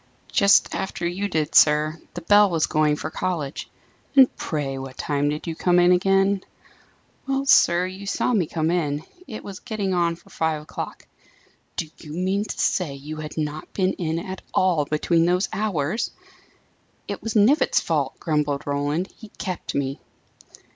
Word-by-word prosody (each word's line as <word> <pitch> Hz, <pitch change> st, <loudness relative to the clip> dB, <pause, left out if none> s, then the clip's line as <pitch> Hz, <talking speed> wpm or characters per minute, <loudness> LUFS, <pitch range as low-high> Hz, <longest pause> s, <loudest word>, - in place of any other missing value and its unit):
"Just 200 Hz, -1 st, +4 dB
after 190 Hz, -2 st, -3 dB
you 185 Hz, +4 st, -1 dB
did, 155 Hz, -5 st, -1 dB
sir. 155 Hz, +1 st, +5 dB, 0.2 s
The 175 Hz, -, -5 dB
bell 205 Hz, +3 st, +6 dB
was 165 Hz, -3 st, +1 dB
going 155 Hz, -1 st, +2 dB
for 155 Hz, +1 st, -5 dB
college." 155 Hz, -7 st, -3 dB, 0.5 s
"And 265 Hz, -2 st, +6 dB
pray 140 Hz, -4 st, -3 dB
what 135 Hz, -1 st, -8 dB
time 145 Hz, 0 st, 0 dB
did 150 Hz, +1 st, -4 dB
you 165 Hz, -, -3 dB
come 180 Hz, +2 st, +2 dB
in 175 Hz, 0 st, +5 dB
again?" 195 Hz, +2 st, +3 dB, 0.8 s
"Well, 270 Hz, 0 st, 0 dB
sir, 175 Hz, -9 st, +5 dB
you 190 Hz, +2 st, -7 dB
saw 250 Hz, -, 0 dB
me 185 Hz, -8 st, +2 dB
come 160 Hz, 0 st, -1 dB
in. 150 Hz, -4 st, -1 dB, 0.2 s
It 215 Hz, -, -7 dB
was 195 Hz, -2 st, -8 dB
getting 210 Hz, -5 st, -3 dB
on 170 Hz, -1 st, +1 dB
for 170 Hz, -, -21 dB
five 160 Hz, -2 st, -1 dB
o'clock." -, -, -7 dB, 0.7 s
"Do 165 Hz, -, -2 dB
you 150 Hz, -2 st, -9 dB
mean 190 Hz, +4 st, 0 dB
to -, -, -6 dB
say 165 Hz, -8 st, 0 dB
you 150 Hz, +3 st, -8 dB
had 155 Hz, 0 st, -7 dB
not 155 Hz, 0 st, -4 dB
been 190 Hz, -1 st, +1 dB
in 160 Hz, -2 st, -2 dB
at 185 Hz, +2 st, -6 dB
all, 175 Hz, -6 st, +3 dB
between 165 Hz, +3 st, +1 dB
those 180 Hz, +2 st, +2 dB
hours!" 210 Hz, -1 st, -1 dB, 1.0 s
"It -, -, -5 dB
was 225 Hz, 0 st, -4 dB
Knivett's 230 Hz, +9 st, +4 dB
fault," -, -, -1 dB
grumbled 150 Hz, -3 st, -1 dB
Roland. 145 Hz, +5 st, -1 dB
"He 220 Hz, -, -12 dB
kept 185 Hz, -3 st, -4 dB
me." 135 Hz, -1 st, -2 dB
170 Hz, 170 wpm, -23 LUFS, 150-195 Hz, 1.0 s, bell